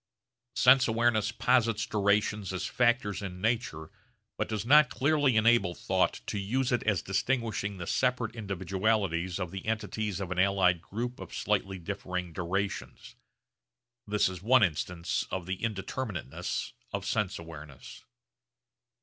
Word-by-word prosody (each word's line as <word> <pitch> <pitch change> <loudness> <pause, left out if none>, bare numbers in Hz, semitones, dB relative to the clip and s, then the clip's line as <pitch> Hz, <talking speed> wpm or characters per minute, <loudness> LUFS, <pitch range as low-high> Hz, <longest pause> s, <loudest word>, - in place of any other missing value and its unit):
Sense 130 0 +6
awareness 110 -2 +2
posits 115 -3 +2
durations 105 -1 +1
as 95 0 -3
factors 120 -5 +1
in 90 -2 -6
nature 105 -8 -1 0.4
but - - -2
does 110 -1 -2
not 150 +1 +7
clearly 140 -2 +2
enable 110 -5 +4
thought - - 0
to 105 - -3
use 125 +6 0
it 120 - +2
as 105 -5 +2
distinguishing 105 -2 -1
the 90 - -5
separate 125 0 0
individualities 95 -3 -1
of 90 -3 -3
the 95 -1 -6
entities 110 -2 -2
of 95 -2 -5
an 90 - -1
allied 95 -3 +3
group 120 +7 -5
of - - -8
slightly 95 0 -1
differing 90 -1 -5
durations. 95 +4 -3 0.9
This 105 0 +2
is 90 -2 -6
one 120 +3 +5
instance 85 0 -1
of 95 -2 -3
the 95 +1 -3
indeterminateness 100 - -3 0.2
of - - -3
sense 105 -3 -1
awareness. 75 -5 -11
100 Hz, 135 wpm, -29 LUFS, 90-115 Hz, 0.9 s, not